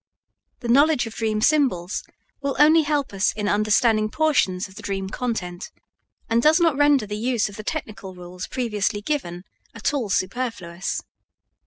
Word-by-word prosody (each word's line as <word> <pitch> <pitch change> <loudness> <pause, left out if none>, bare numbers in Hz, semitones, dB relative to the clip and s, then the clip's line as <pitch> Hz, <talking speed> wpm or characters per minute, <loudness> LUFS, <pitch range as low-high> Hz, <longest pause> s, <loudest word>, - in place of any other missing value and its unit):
The 240 - -5
knowledge 280 +2 +4
of 225 - -7
dream 220 -2 -1
symbols 240 - +1 0.4
will 280 -1 -2
only 310 +3 +6
help 290 -5 -1
us 195 +1 +2
in 210 -1 -3
understanding 215 +1 +2
portions 215 -10 +1
of 190 - -16
the 215 - -10
dream 195 -2 -3
content, 195 -6 -4 0.6
and 230 +1 +2
does 310 +6 +5
not 330 -4 +3
render 290 -4 +4
the 210 0 -5
use 235 -2 0
of 200 - -11
the 215 - -7
technical 215 -10 -5
rules 180 0 -8
previously 210 -4 -2
given 180 - -3 0.3
at 230 +5 -1
all 255 -8 -2
superfluous. 190 -4 -2
220 Hz, 160 wpm, -23 LUFS, 195-275 Hz, 0.6 s, only